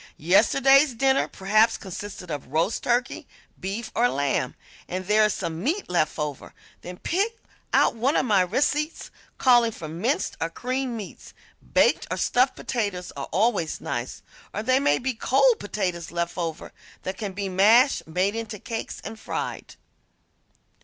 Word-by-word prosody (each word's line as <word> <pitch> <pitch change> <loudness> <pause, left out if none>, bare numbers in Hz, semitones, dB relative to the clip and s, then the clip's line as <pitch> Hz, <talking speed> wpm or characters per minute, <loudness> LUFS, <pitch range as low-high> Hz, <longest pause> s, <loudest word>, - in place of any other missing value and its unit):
Yesterday's 255 - +4
dinner 265 +3 +2
perhaps 215 +4 +2
consisted 190 -2 -8
of 145 -2 -5
roast 160 - 0
turkey, 245 +1 -1 0.3
beef 210 +4 -4
or 245 +2 +3
lamb, 135 -2 -1 0.3
and 185 +1 -4
there 215 +2 +4
is 210 - +1
some 165 0 -4
meat 330 - -1
left 155 -3 +1
over; 150 -3 -5 0.3
then 180 0 -8
pick 405 - -1 0.3
out - - +4
one 250 +6 0
of - - +2
my 205 -5 +4
receipts 290 - -1 0.3
calling 240 -3 +5
for 165 -7 -8
minced 195 - -1
or 165 - 0
creamed 255 +5 -3
meats; 205 -4 -10 0.4
baked - - +3
or - - -2
stuffed 255 +2 +2
potatoes 200 -7 -3
are 140 -1 -6
always 195 -4 +1
nice, - - -5 0.3
or 210 - -2
there 255 +3 +3
may 145 - +3
be 260 +1 -2
cold 260 +1 +3
potatoes 180 -5 -3
left 170 0 -3
over 165 -3 -4 0.3
that 185 - -5
can 205 -4 -4
be 195 +1 -3
mashed, 215 - +4
made 185 +6 0
into 225 -2 -5
cakes 225 +2 -6
and 220 - -8
fried. - - -5
210 Hz, 155 wpm, -25 LUFS, 180-250 Hz, 0.4 s, calling